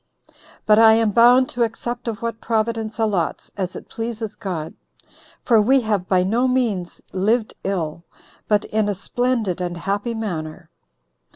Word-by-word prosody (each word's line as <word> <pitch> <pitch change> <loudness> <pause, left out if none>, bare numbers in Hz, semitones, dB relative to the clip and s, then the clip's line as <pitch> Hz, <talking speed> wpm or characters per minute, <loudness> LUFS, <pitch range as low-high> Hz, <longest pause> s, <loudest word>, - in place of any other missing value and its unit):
But 215 0 +5
I 225 -1 +8
am 225 -1 +2
bound 245 +4 +6
to 240 - -4
accept 240 +2 -2
of 230 0 -4
what 230 -1 -3
Providence 225 0 -1
allots, 210 -7 -1
as 185 -2 -3
it - - -9
pleases 225 -2 -5
God; 165 -5 -5 0.7
for 230 -4 +4
we 260 +5 +4
have 205 -5 -1
by 185 -1 +3
no 230 +7 +1
means 225 -9 -1
lived 215 +4 +1
ill, 170 -4 -3 0.4
but 210 0 +2
in 215 -1 0
a 205 - -1
splendid 225 -3 -1
and 175 -1 -3
happy 200 +6 -2
manner." 165 -6 -5
215 Hz, 155 wpm, -21 LUFS, 190-230 Hz, 0.7 s, I